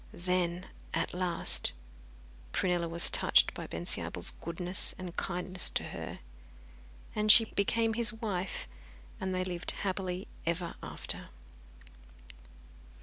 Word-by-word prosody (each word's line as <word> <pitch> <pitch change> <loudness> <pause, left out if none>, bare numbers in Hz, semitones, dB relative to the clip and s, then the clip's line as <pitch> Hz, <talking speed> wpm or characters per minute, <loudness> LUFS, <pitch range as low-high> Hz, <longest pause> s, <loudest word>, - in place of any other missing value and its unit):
Then, 180 0 -1 0.3
at - - -1
last, 180 -1 0 0.8
Prunella 175 -2 +1
was 170 +1 0
touched - - +5
by - - -6
Bensiabel's 85 +1 0
goodness 175 +2 -1
and 180 -2 -7
kindness 180 0 +1
to - - 0
her, - - -7 0.9
and 215 0 +6
she 225 +1 +9
became 225 +2 +1
his 235 +1 +4
wife, 200 - -3 0.5
and 190 - -2
they 185 0 0
lived 180 -1 -3 0.2
happily 185 -1 -2 0.2
ever 170 +1 -2
after. - - -2
185 Hz, 110 wpm, -31 LUFS, 175-195 Hz, 0.9 s, she